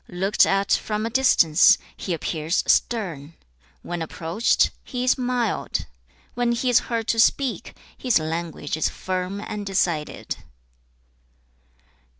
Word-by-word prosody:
Looked 190 +3 +2
at 195 0 0
from 215 0 0
a 230 - -3
distance, 220 -11 +5 0.2
he 185 - -6
appears 160 +1 -1
stern; 170 - 0 0.5
when 175 -1 -5
approached, 165 +7 +1
he 250 -1 -4
is 255 - +3
mild; 245 -3 -2 0.5
when 240 0 0
he 245 +1 0
is 240 - +6
heard 230 -2 -2
to 230 - +1
speak, 260 +3 +1 0.2
his 250 -3 +2
language 160 -2 -3
is 155 - 0
firm 185 +1 -4
and 210 -1 -5
decided.' 180 -6 -2
195 Hz, 125 wpm, -23 LUFS, 165-235 Hz, 0.5 s, is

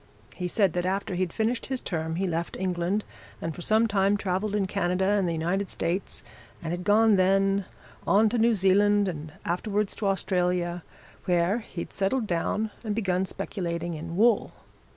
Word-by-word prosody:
He 180 - -3
said 195 -1 +2
that 175 0 -1
after 195 +1 -1
he'd 180 -1 -1
finished 230 +4 -1
his 265 -1 -1
term 160 -5 -3
he 190 +3 0
left 170 -1 -2
England 185 +2 -1 0.4
and 165 - -3
for 175 - -9
some 220 +5 +3
time 200 -1 +2
travelled 200 +2 -1
in 205 -2 +1
Canada 185 -1 0
and 200 -1 +2
the - - -1
United 180 +5 -1
States, 175 +3 -2 0.4
and 165 - -3
had 175 +1 -4
gone 215 +1 +5
then 195 +1 +3 0.4
on 215 +2 +5
to 235 +2 0
New 230 0 +4
Zealand 205 +1 +4
and 155 -3 -5
afterwards 205 +4 -1
to 210 - -1
Australia, 180 -2 0 0.4
where 180 +4 +2
he'd 180 -6 -7
settled 215 +5 0
down 210 +4 -1
and 215 -2 -2
begun 190 -3 0
speculating 175 -3 -3
in 165 +2 -6
wool. 225 +1 +3
190 Hz, 170 wpm, -27 LUFS, 175-205 Hz, 0.4 s, gone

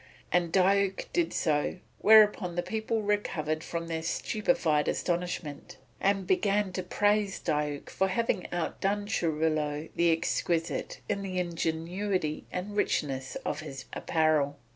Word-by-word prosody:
And 175 -2 +2
Diuk 195 +1 +2
did 345 -1 +1
so; 150 +1 0 0.2
whereupon 210 -4 +6
the 175 - 0
people 220 +3 -2
recovered 165 -7 -1
from 170 0 -4
their 165 -1 -3
stupefied 165 -4 +1
astonishment 175 -4 -2 0.2
and 195 -1 +1
began 200 +1 +1
to 185 - -2
praise 205 +2 +1
Diuk 150 -1 -2
for 190 - +1
having 195 -1 -1
outdone 195 +4 -1
Churilo 155 -5 0
the 170 0 +4
Exquisite 165 0 -1
in 200 -1 -1
the 190 -2 -4
ingenuity 170 0 -1
and 195 +3 -4
richness 135 -9 -1
of - - -2
his 135 -1 -7
apparel. 155 -3 +1
175 Hz, 125 wpm, -29 LUFS, 155-200 Hz, 0.2 s, whereupon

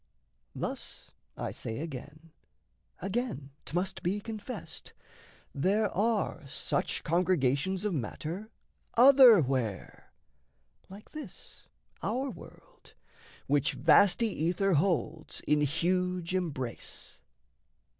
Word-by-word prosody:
Thus, - - -2 0.3
I - - -3
say, 115 - -5
Again, 155 +2 -8 0.7
again, 195 - -3 0.2
'tmust 185 +3 -2
be 190 +4 0
confessed 210 -6 -7 0.6
there 200 +8 +1
are 205 -7 0
Such - - -1
congregations 175 +1 +1
of 210 - 0
matter 160 - -4 0.5
otherwhere, 205 - +5 0.8
Like 200 +3 -13
this 300 - -9 0.3
our 265 +2 -1
world - - -15 0.5
which 145 -1 +2
vasty 185 - +5
ether 180 +2 0
holds 160 -1 0
In 150 0 +2
huge 180 +4 0
embrace. 145 -10 -4
180 Hz, 85 wpm, -30 LUFS, 150-205 Hz, 0.8 s, otherwhere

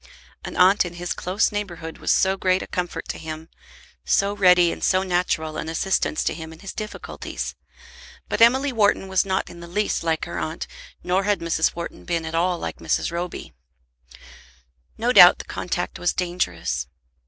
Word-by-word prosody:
An - - -7
aunt 190 +3 +6
in 175 -1 -7
his 175 -2 -3
close 185 +6 0
neighbourhood 175 -6 -5
was - - 0
so 190 0 +3
great 185 -1 +1
a - - -9
comfort 180 -1 -4
to - - -4
him, 160 0 -7 0.5
so 200 +1 +2
ready 180 -3 +5
and - - -7
so 185 0 +3
natural 175 -4 -1
an 160 - -4
assistance 165 -1 0
to - - 0
him 160 0 -8
in 160 - -12
his 195 - -7
difficulties! 215 -1 -6 0.7
But - - -2
Emily 260 +4 +5
Wharton 205 -3 +2
was 190 +1 +2
not 190 0 0
in 175 - -11
the 170 - -9
least 205 +2 -1
like 160 -1 0
her 85 - -5
aunt, 80 -1 -4 0.4
nor 185 +2 +1
had 205 -1 +2
Mrs. 165 -1 0
Wharton 170 0 -7
been 170 -2 -2
at 160 - -5
all 175 +2 +1
like - - -5
Mrs. - - -1
Roby. 170 - -5 1.4
No - - +1
doubt - - +9
the - - -8
contact - - -4
was 175 - +1
dangerous. 90 - -2
180 Hz, 180 wpm, -23 LUFS, 165-195 Hz, 1.4 s, doubt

